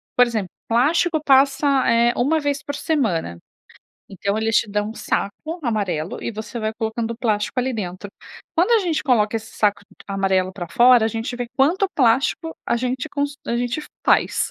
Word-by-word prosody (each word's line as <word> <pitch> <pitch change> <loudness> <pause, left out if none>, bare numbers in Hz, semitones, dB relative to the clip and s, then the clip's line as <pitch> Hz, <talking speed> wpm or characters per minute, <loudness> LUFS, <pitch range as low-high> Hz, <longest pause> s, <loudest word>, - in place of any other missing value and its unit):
por 250 - +6
exemplo, 215 -6 -3 0.2
plástico 315 +8 +2
passa, 275 +1 +4 0.2
eh, 235 +1 +3
uma 310 +6 +2
vez 285 -1 -1
por 285 - -5
semana. 215 - -1 0.7
Então, 200 +1 -2
eles 225 0 +1
te 210 - +1
dão 210 +1 -1
um - - -9
saco 310 - -3
amarelo 190 -8 -2
e - - -2
você 220 +1 -6
vai 215 0 -1
colocando 225 0 -3
o - - -9
plástico 215 0 -1
ali 255 +1 0
dentro. 195 -3 -5 0.5
Quando 355 +7 +2
a 460 - +6
gente 345 -6 -1
coloca 225 -5 +2
esse 225 0 -8
saco 205 -1 +1
d - - -20
amarelo 190 -1 0
pra 175 -3 -7
fora, 240 0 +5
a - - +2
gente 225 +3 -4
vê 245 -1 -4
quanto 355 +9 +2
plástico 270 +6 +1
a - - +1
gente 255 +4 -2
cons 285 0 -2
a 235 - -1
gente 245 +5 -2 0.2
faz, - - +2
235 Hz, 185 wpm, -21 LUFS, 210-280 Hz, 0.7 s, por